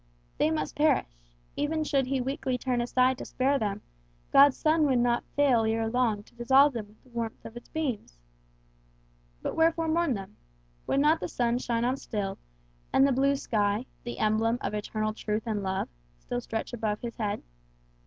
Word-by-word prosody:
They - - +3
must 155 -1 -2
perish; 300 0 +3 0.5
even 310 +2 0
should 275 -4 +1
he 265 -1 0
weakly 260 0 -2
turn 250 -1 -1
aside 255 +1 +2
to - - -6
spare 275 +2 +1
them, 205 -1 -2 0.5
God's 280 0 +7
sun 310 -1 +3
would 260 -2 +3
not 240 0 +2
fail 270 -6 +4
ere 225 0 0
long 225 -3 +1
to - - -23
dissolve 265 +4 +5
them 220 -3 -5
with 210 +1 -24
the 255 - -22
warmth 230 -2 -5
of 225 - -9
its 240 - -11
beams. 260 - -3 1.3
But - - -2
wherefore 325 0 +2
mourn 320 -4 +1
them? 195 -1 -8 0.5
Would 275 - +2
not 310 +3 +4
the - - -3
sun 240 0 0
shine 235 -1 -1
on 255 +2 +1
still, 200 -6 -4 0.5
and 270 - +5
the - - +2
blue 275 +2 +3
sky, 210 -2 0 0.2
the 240 - -6
emblem 220 +2 +2
of - - -3
eternal 215 +1 -2
truth 215 0 -2
and 215 -3 -1
love, 190 0 -2 0.3
still - - -4
stretch 225 - -4
above 215 -3 -2
his 235 -1 -6
head? 210 -3 -2
240 Hz, 185 wpm, -28 LUFS, 215-275 Hz, 1.3 s, God's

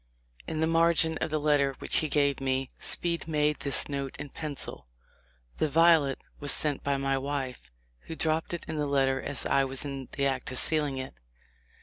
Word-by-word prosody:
In 155 - -3
the - - +3
margin 165 0 +2
of - - -2
the 155 0 -1
letter 145 -2 +2
which - - +2
he 155 - +2
gave 140 -1 +1
me, 130 -1 -1
Speed 170 -2 0
made 150 -1 0
this 140 -5 +3
note 140 -2 -4
in 145 - -7
pencil: 145 - -6 0.7
"The 155 - 0
violet 160 -3 +4 0.2
was 145 -1 +2
sent 150 -3 +2
by 140 -1 0
my 135 0 0
wife, 135 - -5 0.4
who 160 - -6
dropped 160 0 0
it 175 - -5
in 160 - -4
the 150 -1 -1
letter 135 -1 +1
as 140 - 0
I 135 - +2
was 135 +1 -4
in 135 -2 -6
the 140 - -1
act 130 -2 -1
of 130 - -2
sealing 150 -3 +3
it. 130 - -6
145 Hz, 195 wpm, -28 LUFS, 135-155 Hz, 0.7 s, violet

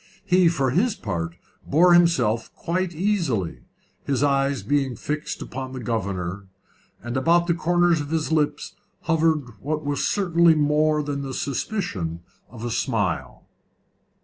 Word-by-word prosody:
He 180 -2 +4
for 140 -6 0
his 205 - +2
part 85 -6 -4 0.3
bore 175 +5 +4
himself 130 -11 +3
quite 180 0 -2
easily, 155 - -1 0.4
his 140 -1 0
eyes 140 -1 +1
being 140 -3 0
fixed 150 0 -4
upon 130 0 -6
the 130 - -5
governor, 100 -4 -3 0.6
and 120 +1 -5
about 170 +6 +3
the 170 - +2
corners 175 -1 +2
of 145 - -6
his 160 0 -1
lips 150 -2 0 0.3
hovered 155 -8 0
what 155 +1 -3
was 145 0 -1
certainly 170 -4 +3
more 150 0 +2
than 145 -1 -3
the 135 -1 -5
suspicion 115 - -3 0.3
of 115 +1 -8
a 120 - -2
smile. - - -2
145 Hz, 140 wpm, -24 LUFS, 125-170 Hz, 0.6 s, He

